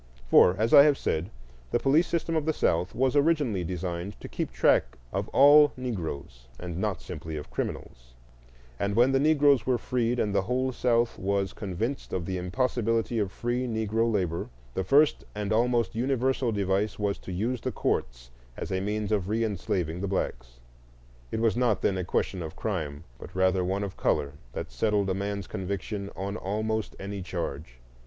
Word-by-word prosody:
For, 90 - +7
as 110 +2 +1
I - - +11
have 145 -1 +5
said, 80 +5 -1 0.4
the - - +2
police 150 +6 +3
system 165 -1 -1
of 160 -1 0
the 160 - +2
South 85 - 0
was 130 +2 +1
originally 145 - +2
designed 90 +2 -4
to - - -8
keep - - -4
track - - +2 0.2
of - - -1
all 145 +1 +7
Negroes, 80 - -5
not 90 +3 -3
simply 80 -1 -6
of 75 - -8
criminals; - - -5 0.6
and 100 0 -1
when 120 +3 +5
the 135 - +3
Negroes 145 -5 +4
were 125 -2 +3
freed 120 0 -1
and 105 -4 0
the 100 - +3
whole 130 +5 0
South 120 -1 +1
was 100 0 0
convinced 110 +7 -4
of 90 -3 -2
the 95 +1 -2
impossibility 115 +3 0
of 100 -3 -1
free 120 +4 -2
Negro 110 0 0
labor, 90 -6 -1 0.2
the 95 - -1
first 145 +10 +4
and 105 0 -1
almost 120 -1 +2
universal 130 +1 0
device 100 0 0
was 100 -1 -1
to - - -8
use 110 +7 -2
the - - -2
courts - - -2 0.3
as - - -5
a 95 0 0
means 105 +1 -2
of 100 -4 +1
reenslaving 95 -6 -1
the 100 - -1
blacks. - - -3 0.7
It 110 - -2
was 115 -1 +2
not 120 -4 +1
then 95 -2 +1
a - - -1
question 90 +1 -1
of 80 -1 -6
crime, 80 -8 -3 0.2
but 90 - -11
rather 95 0 +2
one 95 +3 -1
of 100 -2 -6
color, 70 0 0 0.2
that - - -5
settled 105 -3 +1
a - - +1
man's 100 0 -3
conviction 100 +1 -4
on 100 +2 -4
almost 110 +2 -2
any 100 0 -5
charge. 80 -8 -5
100 Hz, 175 wpm, -27 LUFS, 90-120 Hz, 0.7 s, I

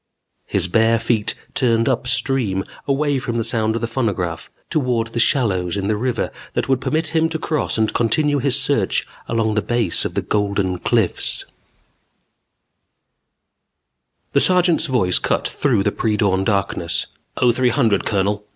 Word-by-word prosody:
His 90 - 0
bare 110 +4 +3
feet 110 -1 0 0.2
turned 115 -2 +2
up 130 -1 0
stream, 115 -5 0 0.2
away 140 0 +1
from 120 -2 -3
the 115 - 0
sound 110 -1 0
of 115 - -2
the 115 - -1
phonograph, 100 -9 -2 0.2
toward 125 -6 0
the 115 - -3
shallows 100 - +1
in 100 - -2
the 105 +1 +1
river 120 +3 -2 0.2
that - - 0
would 130 -2 +1
permit 155 +4 -1
him 160 0 +1
to 160 - -2
cross 155 -5 -2
and 110 -1 +1
continue 145 +5 +1
his 135 0 +2
search 135 -8 +1 0.2
along 115 -1 +1
the 105 - +1
base 120 -7 0
of - - -4
the - - 0
Golden 100 -3 -1
Cliffs 115 -4 0
_ - - -31 2.8
The - - +5
sergeant's 180 -3 +3
voice 110 -9 +2
cut - - 0
through 120 -9 +1
the 105 - +1
pre 110 0 -1
dawn 95 -3 +2
darkness. 95 -4 -1 0.3
"Oh, 125 -1 +4
three 125 +1 +2
hundred, 115 -5 +2
Colonel.... 105 +1 -1
115 Hz, 160 wpm, -20 LUFS, 105-130 Hz, 2.8 s, The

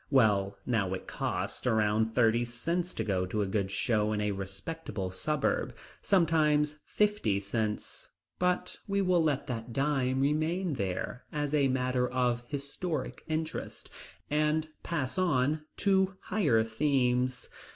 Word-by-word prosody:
Well, 105 -7 +3
now 100 -6 +1
it 95 - -8
costs - - -3
around 110 -1 +2
thirty 115 -1 +4
cents 165 +10 -2
to - - -1
go 95 -3 0
to 105 +3 0
a - - 0
good 95 0 -1
show 105 0 +1
in 105 - -1
a 105 0 0
respectable 95 - -5
suburb, 150 +9 0 0.3
sometimes 150 -5 +3
fifty 210 - +1
cents. 105 +1 -2 0.3
But 180 0 0
we 200 0 +1
will 180 -2 +3
let 145 -3 +1
that 115 -1 -5
dime 135 -2 +1
remain 155 +5 +1
there, 100 +2 -3
as 145 -1 -2
a 145 -2 +4
matter 125 -1 +1
of 125 -1 +1
historic 145 +2 -4
interest, 155 0 -4 0.4
and 150 +1 +1
pass 155 0 -2
on, 155 -3 +1
to 190 -1 +2
higher 145 - +2
themes. 125 +1 +1
130 Hz, 135 wpm, -30 LUFS, 110-155 Hz, 0.4 s, thirty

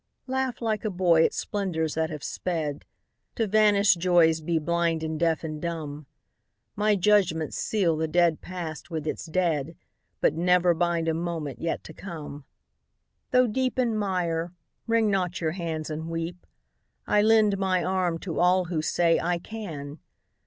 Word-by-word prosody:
Laugh 260 -2 -2
like 220 -2 -1
a 215 - 0
boy 175 -4 +3
at - - +3
splendors 175 -7 -2
that 160 0 -1
have 150 -4 -7
sped, 160 -5 -3 0.5
To 225 - +1
vanished 205 -3 +4
joys 165 -2 +4
be 165 +1 0
blind 165 0 0
and 160 -1 -3
deaf 165 -1 +1
and 155 -1 -5
dumb; 155 -4 -5 0.7
My 210 0 +2
judgments 185 -6 +2
seal 185 -7 +1
the 160 +1 -1
dead 170 -1 +2
past 170 -4 -6
with 160 -3 -4
its 155 - -4
dead, 160 -3 0 0.4
But - - +3
never 180 +1 +3
bind 170 0 0
a 165 - +2
moment 165 -4 -4
yet 165 - -2
to 160 - -10
come. 150 -6 -8 0.8
Though 250 0 +4
deep 255 +3 -1
in 240 -3 +1
mire, 175 -4 -1 0.3
wring 225 -2 +2
not 180 -3 -1
your 160 -2 0
hands 160 -3 -4
and 160 +2 -5
weep; 165 +2 -5 0.6
I 210 - +3
lend 215 -2 +4
my 185 -2 +1
arm 185 -3 0
to 170 -4 -4
all 180 +1 +4
who 170 -2 -2
say 165 +1 +2
"I 175 0 0
can!" 165 -8 -7
170 Hz, 160 wpm, -26 LUFS, 160-195 Hz, 0.8 s, vanished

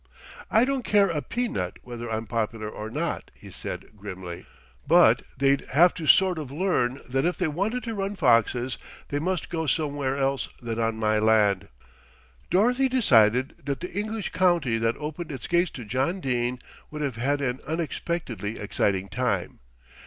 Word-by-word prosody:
"I 220 +3 +4
don't 270 0 0
care 205 -4 +3
a 155 -3 -1
pea 245 +8 -2
nut 90 - -3
whether 120 -1 -6
I'm 110 0 -2
popular 110 0 -2
or 105 0 -6
not," - - -3
he - - -13
said - - -7
grimly; 95 -4 -8 0.4
"but - - +6 0.2
they'd 140 +1 +3
have 170 +5 +6
to 160 -3 -6
sort 185 -1 +5
of 150 -4 -6
learn 140 -5 0
that 135 +2 0
if 175 +2 0
they 180 - +1
wanted 200 +11 -1
to 230 - -4
run 200 0 -2
foxes, 125 - +2 0.3
they 145 - -1
must 180 +2 -2
go 160 -2 -2
somewhere 140 -3 0
else 135 0 0
than 115 -2 -4
on 115 0 +1
my 110 -1 +2
land." 105 -3 +3 0.8
Dorothy 245 +8 +3
decided 125 - +4
that 140 -2 -2
the 180 - -6
English 215 +2 -3
county 170 -11 +2
that 115 +1 0
opened 155 +2 -5
its 135 -4 -6
gates 175 0 +2
to 120 - -7
John 130 - 0
Dene 125 -4 -1 0.3
would 150 0 -5
have 140 +2 0
an 130 -2 -1
unexpectedly 155 -8 -3
exciting 100 -1 0
time. 100 -6 -2
135 Hz, 165 wpm, -26 LUFS, 115-175 Hz, 0.8 s, but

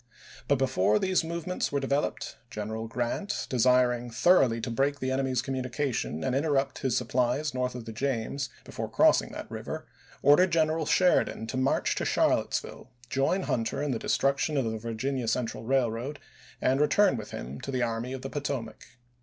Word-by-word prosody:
But 140 - +4
before 105 -6 +2
these 185 - +1
movements 170 +2 -3
were 140 - +1
developed, 140 +1 -1
General 110 +2 -4
Grant, 125 - -2
desiring 125 -1 +3
thoroughly 120 -2 +4
to 120 - -3
break 140 +4 0
the 130 0 -1
enemy's 130 -2 0
communications 130 - -2
and 130 - 0
interrupt 140 -2 +1
his 130 -3 0
sup 125 - -3
plies 130 +4 +1
north 125 -1 -1
of 120 -2 -7
the 115 - -6
James, 130 +2 -2
before - - -5
crossing - - +4
that - - -7
river, - - -5 0.4
ordered 165 +6 +6
General 160 -1 +1
Sheridan 180 -10 +3
to 115 - -5
march 130 +1 +1
to - - -1
Charlottesville, 120 - 0 0.2
join 140 +8 +1
Hunter 120 +4 -1
in 145 - -1
the 115 - -1
destruction 140 +2 +1
of 135 - +1
the 110 -1 -2
Virginia 115 +3 -3
Central 115 0 -2
Railroad 130 +2 0 0.4
and 135 +2 +2
return 190 +4 +4
with 110 -3 -6
him 65 +3 -7
to - - -7
the 130 -2 0
Army 115 +2 -2
of 130 - -6
the 135 - -4
Potomac. 130 -5 -5
130 Hz, 170 wpm, -28 LUFS, 115-140 Hz, 0.4 s, ordered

